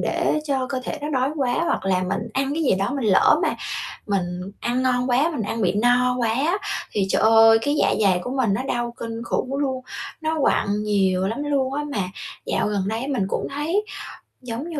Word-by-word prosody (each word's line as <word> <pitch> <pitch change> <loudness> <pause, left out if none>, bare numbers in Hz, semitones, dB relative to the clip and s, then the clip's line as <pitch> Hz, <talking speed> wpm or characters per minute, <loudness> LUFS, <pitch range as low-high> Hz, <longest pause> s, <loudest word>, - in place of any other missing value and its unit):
để 305 - +1
cho 265 -3 0
cơ 260 -2 -2
thể 310 - -4
nó 295 - -3
đói 265 +3 +1
quá, 265 0 0
hoặc - - -1
là 185 -1 +1
mình 200 +5 -2
ăn 270 +1 0
cái 325 - -1
gì 255 - +3
đó 195 +4 -1
mình 275 -3 -2
lỡ - - +5
mà - - +1 0.5
mình 180 -3 -1 0.2
ăn 245 +2 0
ngon 250 0 +1
quá, 280 +7 +3
mình 230 - -2
ăn 225 +2 -3
bị 195 - +2
no 245 +3 +3
quá 235 -2 +1
á, 305 - +1 0.3
thì 195 -2 +1
trời - - +2
ơi, 225 0 +7
cái, 290 +1 +1
dạ - - +3
dày 190 -4 +4
của - - -5
mình 230 -7 +2
nó 245 - -1
đau 240 -2 -2
kinh 230 0 -5
khủng 255 +3 -2
luôn, 265 -2 -2 0.4
nó 315 0 -1
quặn 210 -5 +1
nhiều 190 -3 +1
lắm 235 +7 -3
luôn 270 -2 0
á. 295 +1 -2
Mà - - -2 0.5
dạo - - 0
gần 200 -2 -1
đây 230 +5 -3
mình 250 -9 0
cũng - - -2
thấy 330 +9 0 0.6
giống 250 +6 -5
như 315 -3 -4
245 Hz, 225 wpm, -23 LUFS, 210-275 Hz, 0.6 s, ơi